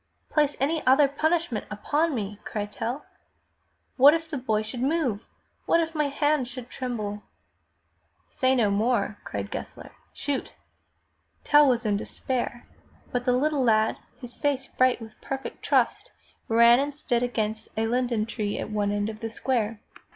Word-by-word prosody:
"Place 295 -2 +2
any 310 +4 0
other 275 +2 +6
punishment 315 -4 0
upon 295 +9 0
me!" 210 -2 -4
cried 210 -2 -4
Tell. 240 +5 -4 0.9
*'What 280 +4 +8
if 325 -1 -5
the 290 - -2
boy 220 -4 0
should 235 +3 -6
move? 265 -7 0 0.4
What 335 - +4
if 330 -1 -1
my 300 -2 +1
hand 290 -1 +1
should 250 -1 -9
tremble?" 215 -5 -4 1.1
"Say 260 0 +1
no 220 -5 +3
more!" 225 +5 +1
cried - - -5
Gessler. - - -7 0.2
"Shoot!" 285 -2 -3 0.9
Tell 295 -1 +6
was 240 -1 +1
in 205 -1 +2
despair, 240 +2 -4 0.5
but 245 -1 -1
the 250 - +3
little 285 +2 +1
lad, 220 -2 +3 0.2
his 245 -2 -9
face 280 -2 0
bright 255 -1 +2
with 220 -1 -13
perfect 270 0 -5
trust, - - +1 0.4
ran 235 +2 +6
and 285 +1 -2
stood 245 -5 0
against 220 -3 -2
a 220 - +1
linden 240 -2 0
tree 215 -3 -3
at - - -4
one 205 -1 0
end 205 0 0
of 215 0 -6
the 225 - -4
square. 225 -2 -1
245 Hz, 160 wpm, -26 LUFS, 220-280 Hz, 1.1 s, What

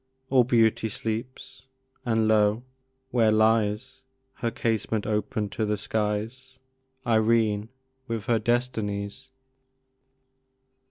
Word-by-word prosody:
All 130 -2 +6
Beauty 115 -2 +2
sleeps! 115 +5 -5 0.4
and 110 -2 +2
lo! 105 +1 +3 0.5
where 115 -3 +3
lies 110 +3 +1 0.4
(Her 115 - -1
casement 110 -2 -1
open 105 +1 -1
to 110 - -3
the 105 0 0
skies) 110 +5 -3 0.5
Irene, 110 -2 +2 0.4
with 115 -2 -3
her 115 -2 +2
Destinies! 110 0 -2
110 Hz, 95 wpm, -26 LUFS, 105-120 Hz, 0.5 s, All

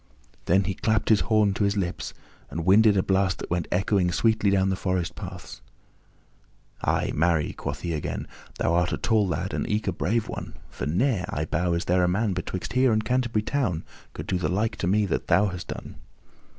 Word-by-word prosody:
Then 95 +3 +3
he 100 +1 -2
clapped 110 +2 0
his 110 -2 +5
horn 105 -3 +2
to 105 - -1
his 100 +1 +1
lips 90 -3 -3 0.3
and 85 0 -4
winded 105 +2 +6
a 95 - +3
blast 95 -1 +1
that - - -8
went 85 -2 0
echoing 95 -1 +2
sweetly 110 +2 +2
down 95 -1 +2
the 95 - +1
forest 90 -2 -1
paths. 95 -3 -9 1.2
"Ay, - - +1
marry," 80 -1 +1
quoth 70 0 -5
he 85 -2 -2
again, 75 - -3 0.3
"thou 85 - +1
art 85 +1 +2
a - - -1
tall 110 -3 +2
lad, 90 +2 -2
and - - -2
eke 105 0 -1
a - - +2
brave 105 +6 -1
one, - - -6 0.2
for - - -4
ne'er, 95 - +1
I 75 - -2
bow, 85 +2 0
is 85 - -1
there 90 +1 +2
a - - +3
man 100 +3 +1
betwixt 90 +2 -4
here 130 0 +4
and 110 0 +1
Canterbury 120 -3 0
Town 110 - -1 0.3
could - - -6
do 90 - -1
the - - -1
like 105 +5 0
to - - -2
me 105 +3 +3
that 95 - -2
thou 100 +4 +4
hast 90 -1 -7
done." - - -7
95 Hz, 210 wpm, -26 LUFS, 90-105 Hz, 1.2 s, winded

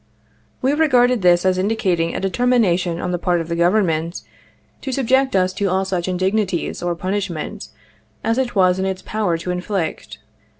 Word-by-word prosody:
We 265 +2 +3
regarded 250 -6 +3
this 175 0 +4
as 185 0 +2
indicating 185 -5 0
a - - -1
determination 190 -5 +1
on 180 - -3
the 175 - -1
part 175 0 +1
of 165 0 -5
the 170 - -1
Government 170 -2 +1 0.6
to 270 - -4
subject 265 -1 +1
us 185 -1 +2
to 195 +1 -1
all 190 +1 0
such 185 -2 -2
in 185 -1 -1
dignities 190 -1 -1
or 175 0 -1
punishment 185 -3 -4 0.6
as 230 +3 +1
it 255 -3 -2
was 185 -1 +3
in 190 - 0
its 190 -1 -3
power 205 -6 -1
to 175 +2 -4
inflict. 180 -1 -3
185 Hz, 175 wpm, -20 LUFS, 175-220 Hz, 0.6 s, this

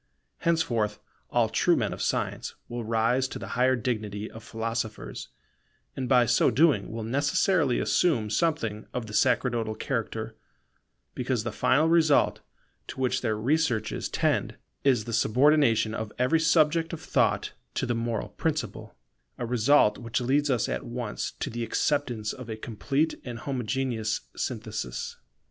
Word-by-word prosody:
Henceforth 120 -12 +1 0.3
all - - +2
true - - +3
men - - -1
of - - -7
science - - -2
will 120 0 -5
rise 115 +4 +1
to - - -7
the - - -7
higher 130 +2 +3
dignity 110 -3 -3
of 110 - -11
philosophers, 115 -1 -4 0.7
and 130 - -3
by 125 -2 +5
so 120 +1 +4
doing 155 -4 +3
will 115 0 -4
necessarily 145 - +2
assume 120 -12 +2
something 115 -8 0
of 125 -2 -2
the 105 - -9
sacerdotal 115 -2 +1
character, 110 -2 -3 0.8
because 125 -3 -1
the 120 - -3
final 150 +9 +3
result 165 -3 +4 0.5
to - - -8
which 130 -1 +1
their 110 -3 0
researches 125 -2 0
tend - - 0 0.3
is 130 -6 +3
the 115 +1 -6
subordination 125 -2 +3
of 110 -1 -4
every 130 +6 +3
subject 160 +1 +3
of 165 - -4
thought - - +1 0.2
to - - 0
the 120 - 0
moral 115 -1 -2
principle; - - -3 0.4
a 120 - -3
result 120 -1 +4
which 120 0 -2
leads 140 +4 +1
us 125 -5 +1
at - - -3
once 120 -2 -4
to - - -4
the 120 +1 -3
acceptance 120 -4 0
of 125 -2 -9
a 110 - -4
complete 135 +8 -1
and 120 -2 -6
homogeneous 125 -4 -2
synthesis. - - -4
120 Hz, 150 wpm, -27 LUFS, 110-140 Hz, 0.8 s, by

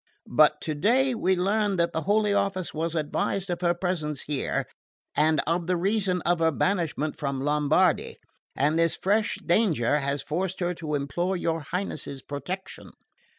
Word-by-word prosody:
But 150 +2 +5
today 230 - +2
we 190 -5 +1
learned 200 +1 +1
that 170 - +1
the 160 - -1
Holy 205 +3 +2
Office 190 -3 -1
was 165 +1 -2
advised 180 +4 -1
of 175 0 -3
her 175 -1 +2
presence 160 -6 -2
here, 145 -3 -2 0.5
and 155 0 +3
of 170 +1 -1
the 180 -1 +1
reason 190 -1 0
of 175 0 +2
her 165 0 +4
banishment 160 -2 -1
from 140 -2 -2
Lombardy; 150 +5 +2 0.4
and 150 +4 +2
this 165 -1 +2
fresh 210 +3 +1
danger 165 - +2
has 140 0 -2
forced 185 +4 -2
her 175 -1 0
to 155 -3 -4
implore 175 +7 -1
your 165 -1 -1
Highness's 150 -4 -5
protection." 180 +7 -6
170 Hz, 155 wpm, -26 LUFS, 150-190 Hz, 0.5 s, But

